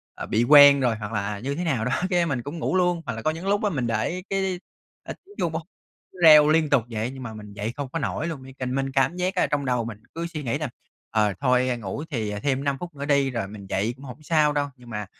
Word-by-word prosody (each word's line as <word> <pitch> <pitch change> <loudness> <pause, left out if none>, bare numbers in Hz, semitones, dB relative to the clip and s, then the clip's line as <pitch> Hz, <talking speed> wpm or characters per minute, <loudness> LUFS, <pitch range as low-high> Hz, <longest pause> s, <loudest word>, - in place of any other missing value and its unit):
à, - - -6
bị 110 +3 +1
quen 145 +1 +8
rồi 125 -4 +1
hoặc 105 0 -6
là, 105 - 0
à, 105 0 -4
như 140 +5 -3
thế 175 - -3
nào 135 -10 0
đó, 125 - -1 0.2
cái 175 -2 +2
mình 135 -7 -2
cũng 145 +7 -7
ngủ 170 - -1
luôn. 175 -2 +2
Hoặc - - -3
là 115 - -6
có 155 - +1
những 165 +4 -7
lúc 205 +1 +1
á 210 - +2
mình 135 -10 -2
để 115 +11 -1
cái, 190 -2 -1 0.4
à, - - -6
tiếng 410 +2 -17
chuông 170 - 0
b - - -7 0.6
cứ 185 - -15
reo 150 -2 +9
liên 155 -1 +3
tục 140 -5 +3
vậy, 115 +1 -3
nhưng 130 -1 -8
mà 115 -3 -6
mình 105 -1 -10
dậy 105 +3 -4
không 140 -2 -4
có 165 - -3
nổi 155 +2 -2
luôn, 155 -6 -6
như 135 - -11
cần 130 0 -2
mình 135 0 -1
cảm 135 +5 +1
giác 180 +2 -1
á 180 - +2
là - - +1
trong 145 -1 -1
đầu 125 -3 0
mình 110 -1 -8
cứ 170 +1 -3
suy 160 -3 -6
nghĩ 125 +2 -1
là 150 -2 -3 0.4
"Ờ, 105 -2 +1
thôi 125 -2 +2
ngủ 115 +6 -5
thì 110 -8 -2
thêm 135 -1 0
5 140 -1 0
phút 175 -3 -8
nữa 140 0 -5
đi, 140 -2 +2
rồi 115 -5 -3
mình 100 -1 -10
dậy 105 +5 -1
cũng 135 +2 -13
hổng 135 +4 -10
sao 150 -1 +3
đâu." 145 -1 0
Nhưng 125 -2 -16
mà, 105 -2 -4
135 Hz, 290 wpm, -24 LUFS, 115-160 Hz, 0.6 s, reo